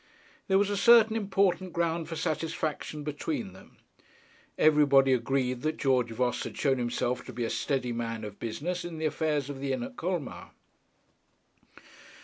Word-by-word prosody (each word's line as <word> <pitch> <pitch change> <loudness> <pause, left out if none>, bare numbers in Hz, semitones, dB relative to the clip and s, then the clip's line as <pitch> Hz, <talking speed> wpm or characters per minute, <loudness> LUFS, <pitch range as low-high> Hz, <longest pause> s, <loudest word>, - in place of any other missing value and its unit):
There 190 - +4
was 200 +1 +2
a 205 - -1
certain 225 +1 +6
important 195 -3 +1
ground 170 -1 -1
for 165 - -4
satisfaction 155 -1 -3
between 200 - -4
them. - - -17 0.8
Everybody 140 -3 +5
agreed 125 0 0
that 155 +2 -1
George 130 -3 +2
Voss 125 +2 -1
had - - -7
shown 135 -3 +1
himself 120 +1 -1
to - - -8
be 120 0 -4
a - - -3
steady 130 -4 -1
man 115 -1 -4
of 105 -1 -8
business 170 +10 -3
in 175 -2 -6
the 160 - -2
affairs 150 -3 0
of 140 -2 -6
the 135 -1 -1
inn 130 - -2
at 255 0 -8
Colmar. 175 -5 -4
150 Hz, 160 wpm, -29 LUFS, 125-175 Hz, 0.8 s, certain